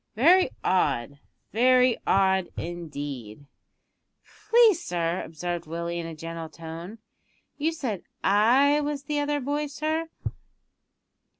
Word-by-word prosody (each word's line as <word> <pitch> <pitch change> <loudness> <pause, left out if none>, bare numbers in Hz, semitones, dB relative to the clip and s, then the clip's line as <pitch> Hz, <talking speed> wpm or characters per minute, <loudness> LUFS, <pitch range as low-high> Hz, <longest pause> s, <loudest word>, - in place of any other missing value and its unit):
Very 345 - +5
odd, 140 -6 +1 0.3
very 250 +1 +5
odd 190 -1 +3
indeed." 145 -8 -6 1.0
"Please, 455 -5 +6
sir," 170 0 -1
observed 170 +1 -5
Willie, 170 +1 -3
in 165 - -4
a 165 - -7
gentle 165 0 -6
tone, 165 +6 -8 0.6
"you 315 +3 +1
said 245 - -4 0.2
I 255 +9 +4
was 290 -1 -3
the 295 +1 -1
other 290 0 0
boy, 290 +2 -2
sir." 310 +3 -2
190 Hz, 110 wpm, -26 LUFS, -, 1.0 s, Please